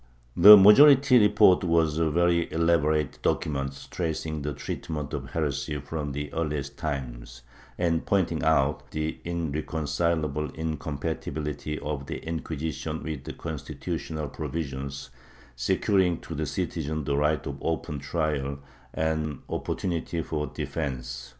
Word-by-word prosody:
^ - - -31 0.3
The 105 +4 +11
majority 135 +6 +8
report 105 -3 +5
was 80 -2 +2
a 80 -1 +2
very 85 +1 +2
elaborate 80 -3 +1
document, 70 -2 -2
tracing 80 -2 -3
the 75 +1 -2
treatment 75 +1 -5
of 70 -2 -4
heresy 75 -1 -1
from 75 0 -4
the 75 0 -5
earliest 75 -3 -2
times, - - -5 0.3
and 85 -2 +1
pointing 90 -5 +1
out 75 -2 +1
the 75 0 -3
irreconcileable 80 -1 -1
incompatibility 75 -1 -4
of 70 -2 -4
the - - -4
Inquisition 80 -1 -4
with 75 -3 -5
the - - -5
constitu 75 -5 -6
tional 75 -3 -4
provisions 70 -3 -5 0.4
securing 90 +8 +1
to 80 - -7
the 80 0 -2
citizen 80 0 -3
the 70 - -1
right 75 -1 +1
of 70 -1 -5
open 80 -2 -2
trial 70 -1 -2 0.4
and 80 -2 -1
opportunities 85 -2 -2
for 75 -2 -2
defence. 65 -5 -5
75 Hz, 125 wpm, -27 LUFS, 70-80 Hz, 0.4 s, The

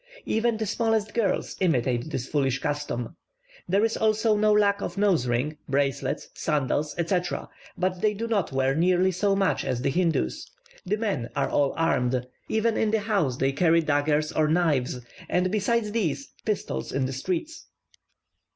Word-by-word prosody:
Even 225 0 +1
the 220 - -2
smallest 220 0 0
girls 215 -5 0
imitate 130 -6 +1
this 130 -6 -3
foolish 135 -3 +1
custom. 145 -6 -3 0.5
There 200 +4 +3
is 225 - -1
also 220 0 +2
no 210 0 +3
lack 205 -1 +3
of - - -4
nose 190 -11 +2
rings, 125 +6 -1
bracelets, 135 0 -1
sandals, 150 0 -1
etc.; 175 +1 -1 0.3
but 185 0 -1
they 210 -1 +2
do 225 +3 -3
not 210 -8 0
wear 135 0 +1
nearly 180 +4 +3
so 195 +2 +1
many 195 -1 +1
as 125 -1 -1
the 140 - +1
Hindoos. 160 - 0 0.4
The 210 +3 +1
men 200 - -2
are - - 0
all 140 -1 +2
armed; 125 -6 +1 0.2
even 220 +1 +1
in 220 - +2
the 220 0 +1
house 195 - 0
they 135 0 +1
carry 165 +3 +3
daggers 150 0 +1
or 155 -1 +2
knives, 150 -7 +1 0.3
and 180 +1 +1
besides 215 +1 0
these, 225 - -1 0.2
pistols 135 - -2
in 135 -1 0
the 130 - -3
streets. 185 - -4
175 Hz, 165 wpm, -26 LUFS, 135-210 Hz, 0.5 s, There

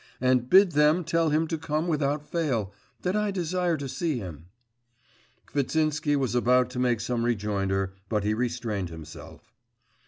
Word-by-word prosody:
And 130 -1 +2
bid 190 -1 +7
them 150 +3 +3
tell 165 0 +1
him 155 +2 +2
to 165 - -2
come 155 +1 -1
without 150 -2 0
fail, 125 - -1 0.3
that 180 +2 0
I 210 0 +1
desire 180 -2 0
to 140 -1 -5
see 155 +1 -2
him.' 85 -7 -8 1.0
Kvitsinsky 150 +1 0
was 135 -4 0
about 125 +1 +3
to 125 - -4
make 125 -3 +2
some 120 0 -1
rejoinder, 100 -4 -1 0.2
but 105 -3 0
he 105 +1 +1
restrained 115 -5 -2
himself. 80 -1 -11
130 Hz, 155 wpm, -27 LUFS, 110-160 Hz, 1.0 s, bid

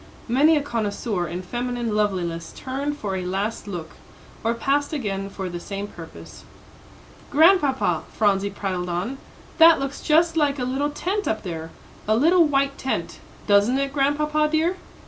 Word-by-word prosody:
Many 295 +7 +4
a 290 - -1
connoisseur 210 -6 -2
in 175 +3 -5
feminine 240 +2 -3
loveliness 180 -5 -1
turned 280 +3 -3
for 200 -7 -3
a 185 - -3
last 195 +4 -3
look, 175 -5 -6 0.5
or 230 +1 +1
passed 285 +5 0
again 195 -8 -3
for 195 -1 -5
the 175 -1 -5
same 200 +3 -5
purpose. 165 -4 -12 0.9
"Grandpapa," 285 - +3
Phronsie 200 -1 +1
prattled 185 -3 -3
on, 190 +11 -3 0.4
"that 325 -1 +8
looks 275 0 -4
just 330 +2 +3
like 295 -3 +2
a 255 - -2
little 270 +3 -1
tent 380 +7 -2
up 220 - -1
there 165 -3 -5 0.4
a 215 - +3
little 335 +6 +5
white 275 -1 0
tent; 265 - -3 0.3
doesn't 205 +5 +4
it, 275 0 -1
Grandpapa 300 +2 +1
dear?" 330 +4 +1
245 Hz, 155 wpm, -23 LUFS, 195-290 Hz, 0.9 s, that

